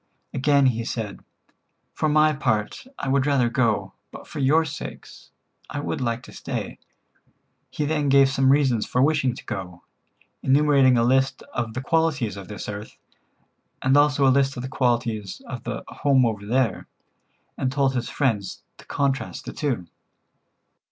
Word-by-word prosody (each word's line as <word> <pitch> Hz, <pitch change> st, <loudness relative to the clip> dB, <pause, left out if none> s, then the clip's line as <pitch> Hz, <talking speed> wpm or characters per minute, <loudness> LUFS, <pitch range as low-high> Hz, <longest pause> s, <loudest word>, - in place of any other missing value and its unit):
Again 140 Hz, +1 st, +3 dB
he 115 Hz, -3 st, +1 dB
said: 110 Hz, -3 st, -5 dB, 0.7 s
"For 155 Hz, -, 0 dB
my 155 Hz, +1 st, +4 dB
part 110 Hz, -, -2 dB
I -, -, -4 dB
would 135 Hz, +1 st, +2 dB
rather 135 Hz, -4 st, +3 dB
go, 115 Hz, -3 st, 0 dB, 0.2 s
but -, -, -11 dB
for 155 Hz, -, -7 dB
your 150 Hz, +4 st, +3 dB
sakes 145 Hz, -, -9 dB, 0.4 s
I -, -, -4 dB
would 145 Hz, -, -3 dB
like 115 Hz, -1 st, -2 dB
to -, -, -12 dB
stay." -, -, -5 dB, 0.9 s
He 150 Hz, -, -2 dB
then 150 Hz, -1 st, 0 dB
gave 135 Hz, 0 st, +6 dB
some 135 Hz, 0 st, +3 dB
reasons 135 Hz, -6 st, +2 dB
for 125 Hz, -, -1 dB
wishing 140 Hz, -4 st, +2 dB
to -, -, -11 dB
go, 90 Hz, -6 st, -6 dB, 0.6 s
enumerating 135 Hz, -2 st, +4 dB
a 115 Hz, -, +3 dB
list 130 Hz, +2 st, +2 dB
of 115 Hz, -2 st, -3 dB
the 130 Hz, -, -2 dB
qualities 145 Hz, -, +1 dB
of 100 Hz, -2 st, -9 dB
this 105 Hz, -1 st, -7 dB
earth, 105 Hz, +1 st, -7 dB, 0.9 s
and 130 Hz, +1 st, +3 dB
also 145 Hz, -1 st, +4 dB
a 130 Hz, -, +5 dB
list 135 Hz, 0 st, +1 dB
of 125 Hz, -, -4 dB
the 130 Hz, -, -5 dB
qualities 115 Hz, -6 st, -1 dB
of -, -, -7 dB
the -, -, -4 dB
"home 135 Hz, -3 st, +2 dB
over 105 Hz, -3 st, -3 dB
there," 120 Hz, -3 st, 0 dB, 0.7 s
and 130 Hz, -, -1 dB
told 135 Hz, -1 st, +1 dB
his 120 Hz, -2 st, -2 dB
friends 110 Hz, -9 st, -1 dB, 0.2 s
to -, -, -14 dB
contrast 140 Hz, -1 st, -2 dB
the -, -, -6 dB
two. 130 Hz, -12 st, -2 dB
130 Hz, 165 wpm, -24 LUFS, 115-140 Hz, 0.9 s, gave